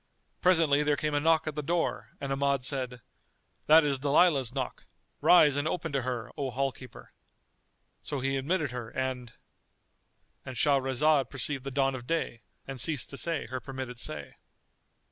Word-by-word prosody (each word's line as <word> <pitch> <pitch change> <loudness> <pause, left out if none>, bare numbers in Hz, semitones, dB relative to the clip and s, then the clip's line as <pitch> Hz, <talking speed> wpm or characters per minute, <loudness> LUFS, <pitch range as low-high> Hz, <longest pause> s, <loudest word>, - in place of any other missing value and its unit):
Presently 160 -5 +4
there 150 -1 +1
came 150 -1 -1
a 145 - +2
knock 160 +1 +3
at 155 - -3
the 150 - -3
door 145 -8 -1
and 140 -1 -4
Ahmad 140 -1 +1
said, 125 -3 -3 0.7
"That 160 +1 +8
is 140 -2 0
Dalilah's 140 -2 +3
knock: - - -5 0.3
rise 150 -5 +6
and 145 +2 0
open 160 -1 -2
to 135 -1 0
her, 120 -1 -4
O 140 -3 -2
hall 135 +2 -1
keeper." 125 -2 -13 0.9
So 145 - -4
he 135 +1 -1
admitted 150 +1 -1
her 120 -2 -6
and——And 130 0 -9
Shahrazad 140 +1 +2
perceived 135 0 -2
the - - -2
dawn 135 0 +1
of 125 -2 -7
day 160 -7 -2 0.2
and 135 -3 -4
ceased 150 -5 0
to 140 - -6
say 165 -1 -1
her 130 - -2
permitted 130 -2 -7
say. - - -6
135 Hz, 165 wpm, -29 LUFS, 130-150 Hz, 0.9 s, That